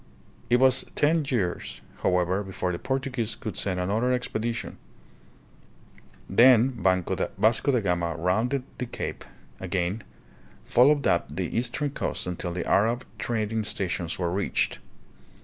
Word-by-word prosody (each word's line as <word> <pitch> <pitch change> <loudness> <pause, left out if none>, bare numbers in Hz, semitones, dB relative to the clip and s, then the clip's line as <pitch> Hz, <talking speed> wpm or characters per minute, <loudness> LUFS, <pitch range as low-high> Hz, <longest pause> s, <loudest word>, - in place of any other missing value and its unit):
It 120 - +5
was 130 -1 +4
ten 155 +2 +3
years, 100 - -2 0.2
however, 90 +2 +1
before 95 -2 -3
the 85 - -4
Portuguese 130 -4 -2
could 110 -7 -6
send 95 -2 -1
another 110 +7 +1
expedition. 120 -2 -2 1.5
Then 125 +4 +6
Vasco 110 - +1
da 125 - +3
Gama 85 -4 0
rounded 110 +11 0 0.2
the 125 - -2
cape - - -5 0.4
again, 95 +2 -2 0.6
followed 140 +4 +4
up - - +2
the - - -4
eastern 135 +4 0
coast - - -3
until 90 0 -3
the 85 0 -3
Arab 115 +5 +2
trad 110 -3 -1
ing 110 -1 0
stations 90 -4 -3
were 85 -2 -1
reached. 100 +3 -1
110 Hz, 130 wpm, -26 LUFS, 90-125 Hz, 1.5 s, Then